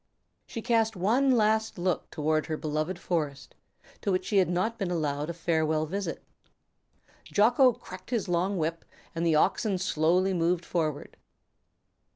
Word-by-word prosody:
She 230 - -6
cast 225 -2 +2
one 230 +10 +2
last 220 -3 +2
look 180 -1 -1
toward 155 +1 0
her 155 -1 -2
beloved 155 +4 -2
forest, 155 -6 -3 0.5
to 200 - 0
which 185 - 0
she 205 - 0
had 185 -2 +4
not 185 +6 -1
been 195 -3 -1
allowed 150 -3 -1
a - - -2
farewell 160 -2 0
visit. 185 +1 -4 1.0
Jocko 245 +5 +4
cracked 185 -5 -12
his 235 -5 -1
long 180 +3 0
whip, 165 0 -2 0.3
the 165 -1 +2
oxen 195 +5 +2
slowly 180 +2 +2
moved 170 0 0
forward. 155 -4 -3
180 Hz, 145 wpm, -28 LUFS, 160-205 Hz, 1.0 s, had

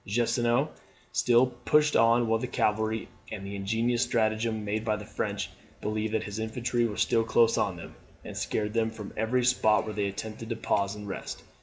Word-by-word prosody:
Gneisenau 120 +5 +2 0.4
still 120 +1 +4
pushed 140 +5 +2
on 115 +1 +5
with 115 0 +1
the - - -2
cavalry; 110 +1 0 0.2
and 105 -3 -5
by 100 - -6
an - - -6
ingenious 115 +5 0
stratagem, 110 -2 0
made 105 +1 -1
the 105 -2 -1
French 105 - -3 0.3
believe 110 +1 -2
that 110 - +1
his 105 +1 -5
infantry 120 +2 0
were 105 - -6
still 115 - +3
close 115 0 +4
on 95 - 0
them, 85 - -10 0.3
and - - -7
scared 105 -1 -2
them 115 -1 +2
from 110 -3 -8
every 120 +3 +1
spot 110 -4 +3
where 110 - -4
they 100 -1 0
attempted 110 +3 -6
to 115 - -1
pause 100 -3 0
and 105 -1 -8
rest. 95 - -6
110 Hz, 190 wpm, -28 LUFS, 105-120 Hz, 0.4 s, on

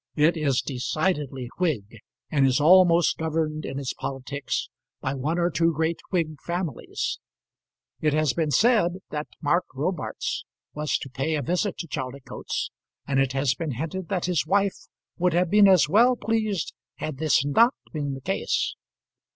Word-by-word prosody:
It 155 +3 +4
is 140 -6 +1
decidedly 140 -1 -2
Whig, 115 - -1 0.3
and 140 -3 +4
is 130 +1 +2
almost 175 +2 +5
governed 155 -1 -1
in 135 - -5
its 140 -2 -3
politics 135 +1 -4 0.3
by 130 - -2
one 145 +5 -1
or 175 0 +1
two 165 +1 +2
great 160 +1 -1
Whig 155 -6 -1
families. 175 -2 -3 0.8
It 150 - +2
has 155 -4 +2
been 160 +1 0
said 210 - +4 0.2
that 150 0 -3 0.2
Mark 170 +5 +2
Robarts 165 +7 -2 0.3
was 150 0 0
about - - -22
to 135 - -8
pay 160 +3 +1
a 145 - -1
visit 180 - -1
to 170 - -5
Chaldicotes, 135 -3 -4 0.3
and 140 -1 +1
it 135 -1 +1
has 135 -1 +2
been 155 0 -4
hinted 165 +8 -4
that 185 -4 -1
his 180 -4 +1
wife 200 +1 +1 0.3
would 180 -1 +2
have 175 0 +2
been 205 -1 +7
as 185 -6 +6
well 235 +9 +5
pleased 215 -6 -1 0.2
had 155 -3 -5
this 155 -3 +3
not 230 - +4 0.2
been 145 -3 -2
the 135 - -9
case. 195 +8 -1
155 Hz, 165 wpm, -25 LUFS, 140-180 Hz, 0.8 s, been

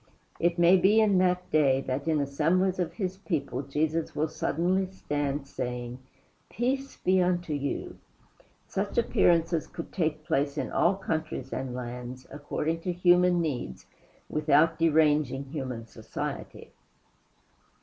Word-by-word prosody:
It 170 +1 +1
may 175 +2 +6
be 200 +4 +4
in 205 -4 +4
that 180 0 +1
day 140 -4 +4
that 135 +3 -3
in 155 -2 +2
assemblies 165 +7 +1
of 175 - -1
his 190 -3 -3
people 145 -9 -2
Jesus 155 +4 -1
will 155 +1 0
suddenly 185 +4 0
stand, 145 -6 -3
saying, 125 -1 -5 0.5
"Peace 270 +4 -2
be 185 0 +2
unto 175 -3 0
you!" 140 -1 -3 0.7
Such - - -3
appearances 165 -1 +2
could 165 - -8
take 155 -3 -1
place 145 -3 0
in - - -2
all 180 +3 +3
countries 160 -8 -4
and 130 -1 -4
lands, 125 +1 -6
according 150 +3 -2
to 180 +2 -2
human 180 0 +4
needs, 130 - -4 0.4
without 155 +2 +3
deranging 150 -4 +3
human 130 -5 -5
society. 110 - -7
160 Hz, 130 wpm, -28 LUFS, 140-180 Hz, 0.7 s, may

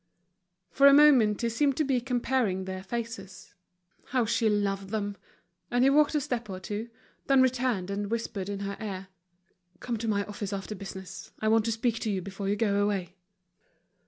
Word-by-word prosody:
For 280 +1 +6
a 280 - +8
moment 255 -9 +6
he 235 - +1
seemed 275 +4 +1
to 310 - +2
be 265 -4 +1
comparing 240 -6 0
their 185 0 -5
faces. 195 -3 -6 0.5
How 250 -2 0
she 230 0 +2
loved 200 -2 -1
them! 205 -1 -2 0.5
And 245 +1 +2
he 270 - +5
walked 300 +2 +4
a - - +4
step 245 -6 -3
or 185 -1 -5
two; 210 +4 -5 0.4
then 270 -1 +5
returned 245 -7 0
and 200 0 -3
whispered 215 -4 -3
in 200 -1 -4
her 200 0 -4
ear: 195 -3 -5 0.7
"Come 240 -2 -3
to 225 +1 -4
my 200 -2 +1
office 205 -1 -5
after 195 +2 -4
business, 190 -1 -8
I 215 - +1
want 225 0 +3
to 230 - 0
speak 225 0 0
to 220 - -2
you 195 -2 0
before 195 +1 -5
you 205 - +2
go 205 -2 +1
away." 195 -3 -1
215 Hz, 190 wpm, -28 LUFS, 195-245 Hz, 0.7 s, a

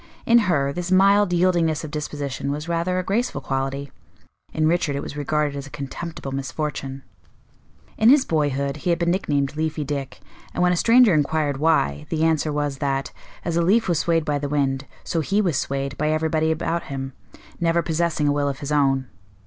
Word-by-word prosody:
In 235 +1 +6
her, 140 -4 +1
this 175 +2 -4
mild 200 +1 +5
yieldingness 170 -3 +2
of 155 - -6
disposition 145 -2 -4
was 150 +3 -3
rather 170 +2 0
a 185 - 0
graceful 215 +7 -1
quality; 135 +1 -3 0.6
in 155 0 +1
Richard 160 -3 +1
it 140 - -3
was - - -7
regarded 150 0 -1
as 140 0 -6
a - - -11
contemptible 140 +1 -6
misfortune. 135 0 -4 1.0
In 220 - +6
his 275 0 +6
boyhood 140 -3 0
he 165 - -3
had 170 - +3
been 170 0 +1
nicknamed 145 -6 0
Leafy 155 0 -2
Dick, 140 -2 -4 0.4
and - - +1
when 180 - +4
a - - +1
stranger 230 +2 +5
inquired 150 -1 +1
why, 75 - +1
the 160 0 0
answer 160 -1 +2
was 145 -2 -2
that, 135 -1 -1 0.3
as 170 - -1
a - - +3
leaf 210 +7 +3
was 170 -4 +1
swayed 165 -2 +1
by 145 -1 0
the 145 0 -3
wind, 135 -1 0 0.2
so 165 - -2
he 195 +6 0
was 180 -8 +1
swayed 140 +1 -2
by 150 +1 +1
everybody 160 0 +1
about 165 +1 -2
him, 135 -1 -5 0.5
never 170 0 +2
possessing 165 -2 0
a - - +3
will 145 -1 0
of 135 - -4
his 145 0 -6
own. 135 -3 +2
150 Hz, 195 wpm, -23 LUFS, 140-170 Hz, 1.0 s, In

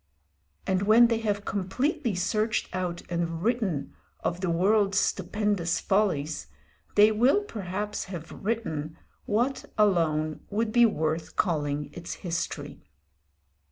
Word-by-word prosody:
And 190 -1 +1
when 225 +4 +6
they 230 -1 +1
have 205 -2 -1
completely 235 - -1
searched 215 +3 0
out 180 -2 -3
and 170 -1 -2
written 210 - 0 0.3
of 175 +1 -2
the 185 - 0
world's 195 +3 +3
stupendous 200 -2 0
follies, 180 -7 0 0.5
they 210 +1 +7
will 250 - +3
perhaps 205 - -4
have 175 -3 -7
written 160 -8 -3 0.3
what 240 +6 0
alone 160 -7 +2
would 220 +2 0
be 240 +1 +6
worth 160 -4 -2
calling 150 -5 0
its 170 0 -6
history. 170 -1 -3
195 Hz, 120 wpm, -27 LUFS, 170-215 Hz, 0.5 s, they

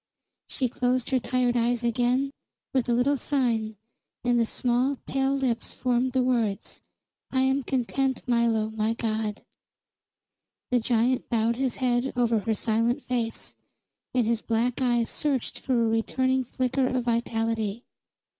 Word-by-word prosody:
She 260 - 0
closed 250 +1 0
her 260 - +3
tired 250 0 +1
eyes 240 0 +1
again, 245 +3 +1 0.4
with 255 -3 +1
a - - +3
little 265 +4 +2
sign, 235 -6 0 0.5
and 245 -1 +3
the 230 - +2
small, 250 +4 +1
pale 270 0 +1
lips 255 -4 -1
formed 250 0 0
the 260 -1 +2
words: 230 -6 -1 0.5
"I 260 - +1
am 265 +1 +2
content, 265 +1 -1
Milo, 230 -3 +2
my 220 +1 0
god." 215 -2 -2 1.3
The 250 - +4
giant 240 +2 +1
bowed 230 0 +1
his 260 -2 0
head 250 0 0
over 235 -2 +2
her 220 +1 -1
silent 230 +3 0
face, 235 -3 -2 0.6
and 245 -3 +3
his 230 0 +1
black 235 +3 0
eyes 240 -2 +2
searched 275 -5 -2
for 265 - -2
a 230 - +3
returning 260 +3 +1
flicker 255 +2 0
of 255 -1 0
vitality. 225 -2 -1
245 Hz, 145 wpm, -26 LUFS, 230-255 Hz, 1.3 s, The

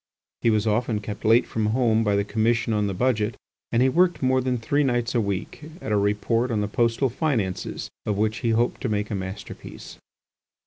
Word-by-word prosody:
He 115 - +3
was 110 -1 +2
often 110 0 +1
kept 105 0 -7
late 115 +2 +5
from 110 -1 -1
home 115 -1 +2
by 105 -2 +2
the 100 - +2
Commission 115 +2 +1
on 105 -1 +1
the 100 - -2
Budget 110 -1 0 0.3
and 115 +2 +3
he 130 - +4
worked 175 +2 +2
more 130 0 +3
than 125 -1 0
three 145 +6 +1
nights 120 -3 0
a 120 - +2
week 100 +4 -4 0.2
at 110 - -5
a - - +3
report 105 +4 +1
on 110 -3 0
the 105 - 0
postal 115 +4 +1
finances 115 - -2 0.2
of 105 -2 0
which 110 +2 0
he 120 - -1
hoped 115 +2 +1
to 125 - -1
make 105 0 -1
a - - -1
masterpiece. 95 0 -8
115 Hz, 210 wpm, -24 LUFS, 105-120 Hz, 0.3 s, late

